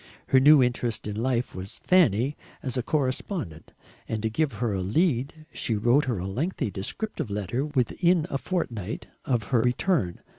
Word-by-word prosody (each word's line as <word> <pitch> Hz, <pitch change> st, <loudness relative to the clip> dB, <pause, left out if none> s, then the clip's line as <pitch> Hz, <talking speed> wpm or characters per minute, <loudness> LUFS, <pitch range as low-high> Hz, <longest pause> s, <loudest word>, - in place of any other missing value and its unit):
Her 130 Hz, -, +6 dB
new 145 Hz, 0 st, +7 dB
interest 120 Hz, -2 st, -1 dB
in 105 Hz, -, -3 dB
life 120 Hz, +2 st, 0 dB
was 95 Hz, +1 st, -7 dB
Fanny 145 Hz, -, +3 dB, 0.3 s
as 130 Hz, -3 st, -3 dB
a 125 Hz, -, +1 dB
correspondent, 130 Hz, -, -2 dB, 0.4 s
and 110 Hz, -1 st, -2 dB
to 110 Hz, -, 0 dB
give 150 Hz, +2 st, 0 dB
her 110 Hz, 0 st, -1 dB
a 95 Hz, -, -1 dB
lead 145 Hz, -, 0 dB
she 115 Hz, -, -1 dB
wrote 120 Hz, +8 st, +3 dB
her 120 Hz, -5 st, -1 dB
a 90 Hz, -, -4 dB
lengthy 120 Hz, -, -2 dB
descriptive 140 Hz, -, -4 dB
letter 105 Hz, +6 st, -2 dB
within 155 Hz, +5 st, +1 dB
a 135 Hz, -, -1 dB
fortnight 115 Hz, -, -3 dB, 0.2 s
of 120 Hz, -4 st, +1 dB
her 120 Hz, -3 st, +3 dB
return. 125 Hz, -, 0 dB
125 Hz, 170 wpm, -26 LUFS, 105-150 Hz, 0.4 s, new